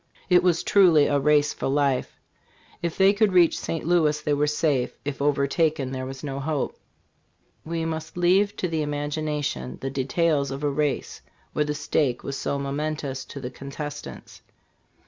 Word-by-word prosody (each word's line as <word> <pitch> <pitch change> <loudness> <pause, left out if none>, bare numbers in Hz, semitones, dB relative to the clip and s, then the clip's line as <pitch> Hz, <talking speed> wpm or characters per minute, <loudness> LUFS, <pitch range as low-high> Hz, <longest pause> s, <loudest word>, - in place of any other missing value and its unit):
It 180 - +7
was 175 -2 +2
truly 175 -7 +5
a 145 -1 +2
race 150 +1 +3
for - - -3
life. 135 -1 0 0.6
If 170 -1 -3
they 195 +1 +5
could 205 -1 +2
reach 175 -3 +5
St. 165 - -4
Louis, 155 -3 +3
they 150 - -1
were 145 +1 +2
safe; 150 -4 0
if 140 -1 -4
overtaken, 140 0 +1
there 130 -1 -4
was 135 +1 -8
no 135 -2 -4
hope. 145 0 -2 0.9
We 165 0 -3
must 160 +1 -5
leave 190 +4 +3
to 180 - -2
the 160 -2 -1
imagination 145 - -3
the 135 - -4
details 140 +2 +1
of 135 +2 -5
a 145 - +1
race 145 0 -2 0.3
where 150 - +1
the 150 0 -2
stake 140 -3 0
was 140 - -4
so 140 - -2
momentous 140 -1 -3
to 140 - -8
the 125 -1 -6
contestants. 145 +2 -8
150 Hz, 165 wpm, -25 LUFS, 140-160 Hz, 0.9 s, It